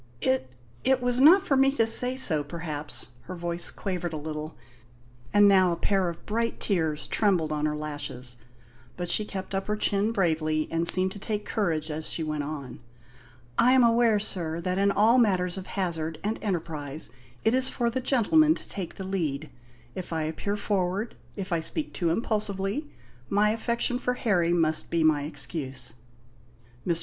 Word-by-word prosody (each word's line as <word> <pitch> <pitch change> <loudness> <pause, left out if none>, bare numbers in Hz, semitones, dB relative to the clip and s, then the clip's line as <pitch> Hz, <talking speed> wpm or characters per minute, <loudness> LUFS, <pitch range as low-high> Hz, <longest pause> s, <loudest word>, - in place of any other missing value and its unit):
"It 130 0 +1 0.3
it 265 -1 +4
was 245 0 +1
not 355 +8 +7
for 275 - +2
me 270 0 +5
to 230 -5 +3
say 250 +3 +1
so, 160 - +4
perhaps." 150 -3 -3 0.2
Her 185 - -6
voice 170 0 -2
quavered 180 -4 -4
a - - -3
little, 155 +1 -6 0.7
and 205 0 +6
now 190 -2 +5
a - - 0
pair 190 0 +1
of 170 - -9
bright 230 +2 -1
tears 160 -6 0
trembled 180 -8 +1
on 150 0 0
her 150 - -2
lashes; 145 -5 -5 0.6
but 175 -1 -3
she 215 - +3
kept 190 -1 -6
up 195 0 -2
her 210 - 0
chin 205 +1 +1
bravely 155 -6 0
and 165 +1 0
seemed 185 +1 +4
to 205 - -9
take 210 0 -3
courage 165 -7 -1
as 155 +1 -2
she 165 - -1
went 155 -1 -2
on. 145 -3 -6 0.8
"I 250 +2 +6
am 260 -1 +6
aware, 230 -2 +4
sir, 170 -5 -2
that 185 +2 -1
in 200 0 +3
all 220 +5 +4
matters 185 -6 +2
of 190 -1 -7
hazard 165 -5 -3
and 215 +2 -2
enterprise 155 - -3 0.3
it 220 - +3
is 260 0 +4
for 235 -1 -1
the 260 +2 -2
gentlemen 300 +6 +4
to - - -9
take 190 -4 -5
the 190 - -6
lead. 160 -6 -3 0.4
If 185 - -7
I 160 -1 -1
appear 180 +6 -3
forward 200 +1 -1 0.2
if 190 -3 -6
I 170 - +2
speak 290 - -4
too 170 -3 0
impulsively 210 - -1 0.4
my 210 +1 +3
affection 235 +2 0
for 250 -1 -1
Harry 180 -9 +1
must 160 -2 +2
be 170 -1 +1
my 150 -2 +3
excuse." 135 -4 -5 0.9
Mr. 170 -2 +2
185 Hz, 180 wpm, -27 LUFS, 155-215 Hz, 0.9 s, not